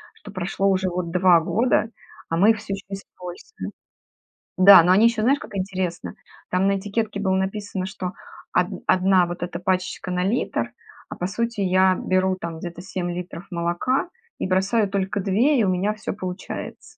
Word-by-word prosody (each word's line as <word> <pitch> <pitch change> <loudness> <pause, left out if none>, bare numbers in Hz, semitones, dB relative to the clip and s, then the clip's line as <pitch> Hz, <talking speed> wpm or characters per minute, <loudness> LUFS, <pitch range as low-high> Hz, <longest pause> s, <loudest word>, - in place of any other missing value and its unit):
что 450 - -12
прошло 190 +2 -1
уже 190 -1 +1
вот 175 -1 -3
2 180 -1 +5
года, 225 +5 +1 0.4
а 165 - 0
мы 200 +5 +5
их 220 - -1
всё 205 -1 -5
еще 195 0 -7
используем. 195 - -8 0.9
Да, 190 -1 +9
но 180 - +3
они 200 +5 +6
еще, 235 -1 +2
знаешь, 270 +6 +3
как - - -10
интересно, 185 -2 -3 0.3
там 185 +2 +2
на 195 0 +2
этикетке 205 +1 -2
было 190 -2 +1
написано, 190 0 -2
что 190 -1 -5 0.5
од - - +3 0.2
одна 185 -1 +4
вот 175 0 -6
эта 175 -1 -4
пачечка 185 0 -2
на 180 0 0
литр, 225 +6 -1 0.4
а - - -6
по 180 - -3
сути 230 +2 -2
я 185 0 +4
беру 185 0 +1
там 170 -3 -6
где-то 175 0 -7
7 185 -1 -4
литров 180 0 -7
молока 175 - -1 0.3
и - - -1
бросаю 195 +3 +2
только 200 +1 -1
2 225 +10 +2
и - - +3
у 195 - +2
меня 185 +3 0
всё 215 0 -5
получается. 185 -2 -7
190 Hz, 180 wpm, -23 LUFS, 180-205 Hz, 0.9 s, Да